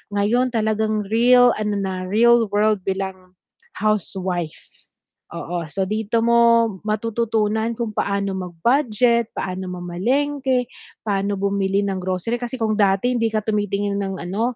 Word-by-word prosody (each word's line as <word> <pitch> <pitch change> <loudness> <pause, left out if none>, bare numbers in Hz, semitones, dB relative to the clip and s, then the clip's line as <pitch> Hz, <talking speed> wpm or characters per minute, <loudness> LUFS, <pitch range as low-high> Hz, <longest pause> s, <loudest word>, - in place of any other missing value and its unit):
Ngayon 230 +5 +2
talagang 215 -1 0
real 245 +1 +6
ano 210 -1 -1
na, 195 -1 -2
real 230 +3 +4
world 210 -1 +3
bilang 190 -1 -4 0.4
housewife. 190 -5 -3 0.5
Oo. 170 -2 -4
So, 195 - -1
dito 215 +2 -1
mo 235 -1 +4 0.2
matututunan 220 0 0
kung 230 -1 -3
paano 200 0 -1
mag-budget, 235 - +1
paano 185 0 -4
mamalengke, 250 +9 -1 0.4
paano 200 -1 -1
bumili 200 0 0
ng 190 -1 -2
grocery, 185 +6 -2
kasi 245 +1 -4
kung 220 -1 0
dati 200 +5 +3
hindi 230 -1 +1
ka 215 -1 -1
tumitingin 205 -1 -1
ng 195 -1 -3
ano, 225 +7 -2
210 Hz, 130 wpm, -21 LUFS, 195-230 Hz, 0.5 s, real